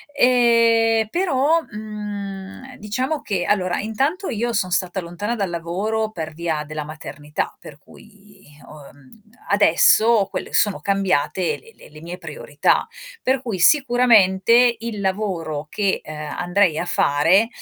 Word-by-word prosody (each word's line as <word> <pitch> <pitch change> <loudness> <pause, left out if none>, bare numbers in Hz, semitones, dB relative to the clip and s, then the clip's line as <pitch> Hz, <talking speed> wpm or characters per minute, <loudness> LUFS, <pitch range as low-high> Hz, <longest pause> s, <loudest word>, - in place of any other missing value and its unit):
Ehm, 230 -2 +3
però, 330 -2 +1
mhmm, 210 +2 -7
diciamo 255 +9 -3
che 190 -4 -2
allora 185 -3 0
intanto 275 - -2
io 235 +1 -2
son 185 -3 0
stata 180 +1 -1
lontana 205 +7 -4
dal 200 -4 -2
lavoro 200 +6 -2
per 160 -4 -6
via 160 -2 -3
della 155 0 -5
maternità 150 -1 -6
per 145 - -12
cui 205 +3 -19 0.2
ho, 150 -2 -13
mhmm, 145 +10 -20 0.3
adesso 205 +2 +4
quelle - - -6
sono 205 -2 +2
cambiate 185 -3 0
le 455 0 -18
le - - -17
le 155 +1 -14
mie 175 +2 -8
priorità; 150 -3 -1 0.4
per 260 0 +1
cui 225 -7 -4
sicuramente 240 - +4
il 225 -3 -5
lavoro 180 -7 -2
che, 200 -2 -1
uhm, 155 - -8
andrei 170 +3 0
a 175 - -2
fare, 175 +8 +3
200 Hz, 135 wpm, -21 LUFS, 170-230 Hz, 0.4 s, adesso